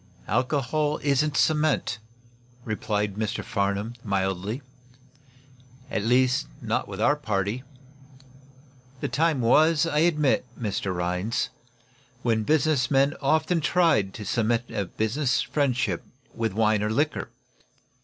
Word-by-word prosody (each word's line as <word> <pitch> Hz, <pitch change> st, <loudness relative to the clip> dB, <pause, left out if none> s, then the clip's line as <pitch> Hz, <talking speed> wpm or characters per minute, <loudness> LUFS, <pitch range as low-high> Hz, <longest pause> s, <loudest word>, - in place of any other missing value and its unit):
"Alcohol 145 Hz, +4 st, 0 dB
isn't 140 Hz, +1 st, +2 dB
cement," 150 Hz, -6 st, +2 dB, 0.7 s
replied 105 Hz, -2 st, -2 dB
Mr. 110 Hz, +1 st, -2 dB
Farnum, 100 Hz, 0 st, -1 dB
mildly. 100 Hz, +4 st, -2 dB, 1.3 s
"At -, -, 0 dB
least, 130 Hz, +5 st, +2 dB
not 110 Hz, -2 st, -1 dB
with 100 Hz, -1 st, -7 dB
our 145 Hz, +6 st, +4 dB
party. 105 Hz, -3 st, -2 dB, 1.4 s
The -, -, -2 dB
time 155 Hz, -3 st, +1 dB
was, 155 Hz, +6 st, +4 dB
I 150 Hz, -2 st, 0 dB
admit, 150 Hz, -4 st, +3 dB, 0.2 s
Mr. 100 Hz, -4 st, -2 dB
Rhinds, 90 Hz, +6 st, -1 dB, 0.7 s
when 115 Hz, -2 st, +2 dB
business 145 Hz, +1 st, +2 dB
men 140 Hz, +1 st, +3 dB
often 155 Hz, +4 st, +2 dB
tried 155 Hz, -, +2 dB
to 105 Hz, -, -7 dB
cement 115 Hz, +2 st, +1 dB
a 100 Hz, -, -2 dB
business 125 Hz, -, 0 dB
friendship 130 Hz, -, 0 dB, 0.3 s
with 115 Hz, -3 st, -2 dB
wine 110 Hz, 0 st, +2 dB
or 105 Hz, -, 0 dB
liquor. 145 Hz, +7 st, 0 dB
120 Hz, 115 wpm, -26 LUFS, 105-150 Hz, 1.4 s, our